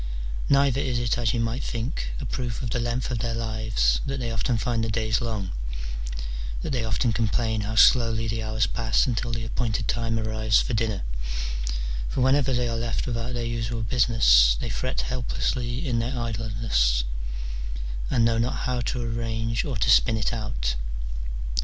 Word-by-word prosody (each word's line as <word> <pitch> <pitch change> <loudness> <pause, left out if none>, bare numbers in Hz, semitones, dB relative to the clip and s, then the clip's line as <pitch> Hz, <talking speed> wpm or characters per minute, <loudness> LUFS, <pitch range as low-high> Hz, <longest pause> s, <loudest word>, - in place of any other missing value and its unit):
Neither 140 -1 +4
is 125 -3 0
it, 120 0 0
as 115 -3 +2
you 120 - -1
might 115 +3 -1
think, - - -3
a - - -4
proof 125 -2 -3
of 120 - -3
the 125 - 0
length 120 +2 -1
of 120 - -1
their 115 0 -1
lives 110 - +1
that 135 0 -2
they 120 -2 -2
often 115 +2 0
find 115 +1 0
the 115 - -1
days 110 +1 +1
long, 110 -5 -2 1.1
that - - -2
they 125 -4 0
often 115 +1 +1
com 115 0 +1
plain 110 0 0
how 105 +2 -3
slowly 115 -1 +5
the 115 +1 -2
hours 110 0 +1
pass 115 -2 +2
until 120 -1 -1
the 115 -1 -2
appointed 110 -2 -1
time 115 -1 0
arrives 110 -1 +2
for - - -1
dinner: 110 - 0 1.1
for - - -1
whenever 135 +1 +4
they 120 -1 +1
are 115 - -1
left 115 0 -1
without 120 0 -2
their 120 -1 -2
usual 115 -1 -2
business, 105 - +5
they - - -3
fret 130 0 -1
helplessly 125 +1 -2
in 120 -2 +1
their 125 +3 -2
idleness, 110 - +1 1.1
and 115 -1 +3
Jknow 115 0 +2
not 120 +2 0
how 125 -1 -1
to 120 +1 -2
arrange 115 0 -1
or 135 -6 -2
to - - +1
spin 115 -2 +5
it 110 - 0
out. - - -2
115 Hz, 180 wpm, -26 LUFS, 110-120 Hz, 1.1 s, slowly